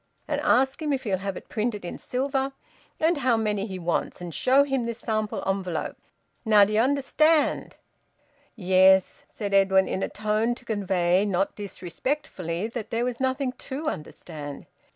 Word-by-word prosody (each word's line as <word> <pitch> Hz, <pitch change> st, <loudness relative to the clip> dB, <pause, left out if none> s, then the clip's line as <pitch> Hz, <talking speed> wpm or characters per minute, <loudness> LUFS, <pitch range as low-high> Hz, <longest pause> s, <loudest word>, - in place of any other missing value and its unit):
And -, -, -1 dB
ask 265 Hz, +4 st, +2 dB
him 300 Hz, -1 st, -1 dB
if 265 Hz, -, -2 dB
he'll 195 Hz, -6 st, -1 dB
have 195 Hz, -1 st, -4 dB
it -, -, -11 dB
printed 215 Hz, -3 st, -2 dB
in -, -, -6 dB
silver, 270 Hz, +1 st, -1 dB, 0.5 s
and 325 Hz, +1 st, +2 dB
how 255 Hz, -4 st, +2 dB
many 210 Hz, -2 st, -1 dB
he 190 Hz, -2 st, -5 dB
wants, 175 Hz, +1 st, -2 dB
and 175 Hz, -2 st, -7 dB
show 265 Hz, -, +4 dB
him 270 Hz, -4 st, -1 dB
this 235 Hz, -1 st, -4 dB
sample 215 Hz, -2 st, -2 dB
envelope. 190 Hz, -4 st, -2 dB, 0.5 s
Now, 210 Hz, -3 st, +6 dB
d'ye 210 Hz, +2 st, +1 dB
understand?" 285 Hz, +3 st, +2 dB, 0.8 s
"Yes," 190 Hz, -2 st, +4 dB
said 200 Hz, -2 st, -5 dB
Edwin, 190 Hz, -1 st, +4 dB
in 190 Hz, -, -2 dB
a -, -, -1 dB
tone 215 Hz, +3 st, 0 dB
to 250 Hz, -, -17 dB
convey, 190 Hz, -4 st, +1 dB
not 195 Hz, -1 st, 0 dB
disrespectfully, 190 Hz, -, -4 dB
that 225 Hz, -2 st, -6 dB
there 230 Hz, +1 st, 0 dB
was 250 Hz, -1 st, -3 dB
nothing 260 Hz, 0 st, 0 dB
to 280 Hz, +4 st, -4 dB
understand. 150 Hz, -, -8 dB
215 Hz, 160 wpm, -26 LUFS, 190-260 Hz, 0.8 s, Now